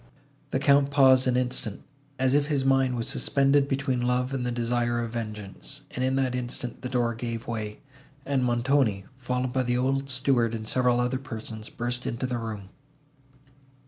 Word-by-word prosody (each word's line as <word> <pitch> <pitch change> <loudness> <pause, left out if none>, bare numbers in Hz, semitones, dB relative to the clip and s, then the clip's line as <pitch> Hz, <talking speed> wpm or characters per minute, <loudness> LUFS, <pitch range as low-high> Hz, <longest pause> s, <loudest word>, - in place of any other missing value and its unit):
The - - 0
Count 140 0 +4
paused 130 -2 +5
an 125 -1 +2
instant, 125 -4 -2 0.3
as 130 0 +2
if 145 0 +3
his 140 -3 0
mind 135 -1 +3
was 115 - -2
suspended 140 0 +2
between 135 -2 0
love 125 +1 0
and 130 -2 -1
the 125 - -1
desire 120 0 0
of 115 -1 -3
vengeance; 105 -4 -6
and, 125 - -3
in 130 +1 +1
that 130 -2 +1
instant, 125 -1 -4
the 125 - -4
door 120 -2 +1
gave 115 0 -5
way, 110 -2 -5 0.4
and 135 -2 +1
Montoni, 120 -4 +2
followed 125 0 -2
by 130 - +2
the 125 -1 0
old 135 +2 0
steward 125 -3 +2
and 110 -1 -6
several 125 0 +2
other 125 +1 0
persons, 110 -3 -7
burst 120 +1 -3
into 120 +3 -2
the 125 -2 -2
room. 105 -4 -6
125 Hz, 175 wpm, -27 LUFS, 115-135 Hz, 0.4 s, paused